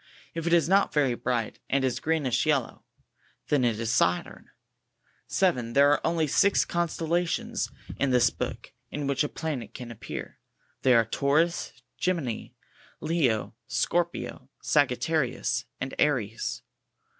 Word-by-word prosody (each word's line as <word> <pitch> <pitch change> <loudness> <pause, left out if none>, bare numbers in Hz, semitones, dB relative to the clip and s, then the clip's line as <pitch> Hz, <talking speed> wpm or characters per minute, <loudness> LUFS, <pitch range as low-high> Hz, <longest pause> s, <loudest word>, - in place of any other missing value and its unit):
If 165 0 -4
it 170 - +2
is 170 -2 +4
not 195 +2 +4
very 140 -4 +3
bright, 120 -2 -2
and 135 -1 +2
is 130 - -1
greenish 155 -4 0
yellow, 140 -6 0 0.6
it 145 -3 +2
is 115 -1 0
SATURX. 90 -6 +1 0.8
7. 125 -12 +1
There 140 +2 +6
are 145 - +2
only 165 -1 +1
six 200 +7 +3
constellations 175 +6 -1 0.3
in 140 - +2
this 125 -2 +4
61 - - 0
book - - -12 0.2
in 145 -1 -4
which 140 +1 +1
a 150 - -2
planet 150 -8 -5
can 120 -2 -7
appear. 110 -2 -7 0.4
They 130 -2 +5
are 115 -1 +5
Taurus, 150 +8 +1 0.3
Gemini, 165 -11 -1 0.5
Leo, 135 -12 0
Scorpio, 130 -1 -1
Sagittarius 130 -3 +1
and 135 - -4
Aries. 120 -7 0
140 Hz, 135 wpm, -27 LUFS, 120-165 Hz, 0.8 s, There